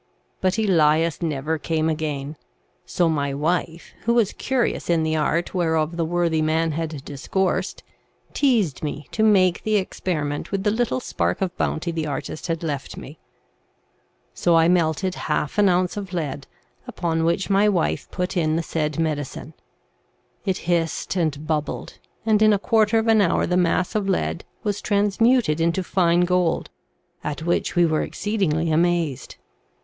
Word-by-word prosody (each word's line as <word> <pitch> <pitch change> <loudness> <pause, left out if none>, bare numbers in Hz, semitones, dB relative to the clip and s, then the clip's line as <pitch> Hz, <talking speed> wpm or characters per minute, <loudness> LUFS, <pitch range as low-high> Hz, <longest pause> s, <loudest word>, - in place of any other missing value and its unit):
But 185 +2 +1
Elias 165 -6 +2
never 155 -1 -1
came 160 -1 0
again; 150 -2 -3 0.5
so 175 - +1
my 140 -3 -1
wife, 165 +2 -2
who 235 +1 +2
was 225 -5 +2
curious 260 -8 -1
in 165 -2 +3
the 160 0 0
art 160 +2 0
whereof 160 -2 0
the 170 - 0
worthy 170 -1 +1
man 160 +1 +1
had 155 -2 -4
discoursed, 185 +6 -2 0.5
teazed 225 - +1
me 150 -1 -5
to 215 - -2
make 190 -5 +4
the 215 0 0
experiment 155 -7 -2
with 195 -1 -1
the 210 - +2
little 240 +3 0
spark - - -1
of 185 -2 -2
bounty 170 +2 -1
the 160 -2 -3
artist 150 +3 -5
had 165 -1 -2
left 145 -4 -4
me; - - -10 1.1
so 170 - +2
I 165 0 +5
melted 175 +1 +1 0.2
half 150 +5 -1
an 205 -1 +5
ounce 180 0 +1
of 195 -2 -6
lead, 145 -5 -3 0.4
upon 165 -2 -1
which 170 +4 0
my 200 +2 +4
wife 180 -5 -1
put 180 +1 -3
in 160 -3 +1
the 165 - 0
said 155 -2 -2
medicine; 150 -4 -3 0.9
it 190 -2 0
hissed 170 +1 0
and 155 -4 -1
bubbled, 155 -2 -3 0.3
and 215 -1 +3
in 215 -1 +6
a - - +3
quarter 220 +2 +2
of 225 0 +1
an 220 -1 +5
hour 180 - +2
the 180 - 0
mass 180 +1 +1
of 205 -3 -1
lead 80 - -1 0.2
was 205 -1 -2
transmuted 205 -3 +2
into 170 +3 +1
fine 175 -1 +2
gold, 180 -1 +1 0.5
at 150 +1 -4
which 175 +1 0
we 175 0 +5
were 155 -1 +1
exceedingly 170 -7 -1
amazed. 165 -3 0
170 Hz, 160 wpm, -23 LUFS, 155-190 Hz, 1.1 s, in